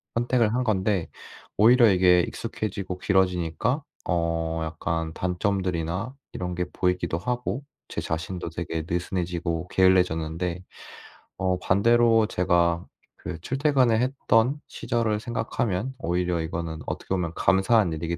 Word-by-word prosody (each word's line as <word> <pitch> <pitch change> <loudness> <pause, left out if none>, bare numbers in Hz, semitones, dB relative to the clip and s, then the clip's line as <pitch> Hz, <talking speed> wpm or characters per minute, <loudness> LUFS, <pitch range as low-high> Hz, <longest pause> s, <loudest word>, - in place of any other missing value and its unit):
선택을 120 -1 +2
한 125 - +1
건데 100 -5 0 0.5
오히려 120 +2 +7
이게 90 -1 +5
익숙해지고 95 -1 -4
길어지니까 95 - +1 0.3
어 80 -1 0
약간 80 0 -3
단점들이나 90 +3 -2 0.2
이런 90 -1 -4
게 90 - -1
보이기도 90 -2 0
하고 125 +5 -2 0.2
저 - - -4
자신도 80 +2 -4
되게 80 -1 -4
느슨해지고 85 -1 -2
게을러졌는데 90 -2 +1 0.7
어 90 -1 0
반대로 115 +3 +4
제가 85 -2 +1 0.3
그 85 -1 -6
출퇴근을 130 - +2
했던 130 +1 +2
시절을 115 -2 -1
생각하면 120 0 -2
오히려 90 0 0
이거는 80 0 -4
어떻게 - - -5
보면 90 -3 -1
감사한 95 -2 +3
일이기 85 +2 -3
90 Hz, 305 characters per minute, -25 LUFS, 85-110 Hz, 0.7 s, 오히려